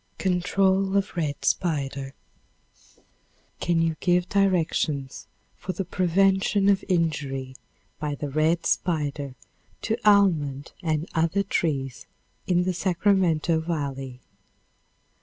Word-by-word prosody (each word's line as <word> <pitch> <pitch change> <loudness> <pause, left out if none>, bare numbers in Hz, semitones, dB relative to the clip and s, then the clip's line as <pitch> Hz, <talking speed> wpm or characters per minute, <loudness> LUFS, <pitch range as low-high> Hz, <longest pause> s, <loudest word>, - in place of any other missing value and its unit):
Control 190 +1 +1
of 200 -1 -1
Red 150 -4 -2
Spider. 140 -5 -1 1.4
Can 175 -1 +1
you 165 -1 -1
give 180 0 +2
directions 165 -8 0 0.3
for 185 - -5
the 195 - -3
prevention 195 +3 +2
of 195 -1 +3
injury 140 -7 -1 0.4
by 150 -2 -2
the 145 0 -5
red 160 +3 +1
spider 145 -6 -1 0.5
to 220 - 0
almond 165 -10 +3
and 160 -1 -1
other 165 +4 +1
trees 135 -9 -2 0.4
in 180 -1 +2
the 185 0 0
Sacramento 175 -3 +2
volley? 135 -6 -4
165 Hz, 100 wpm, -25 LUFS, 145-190 Hz, 1.4 s, of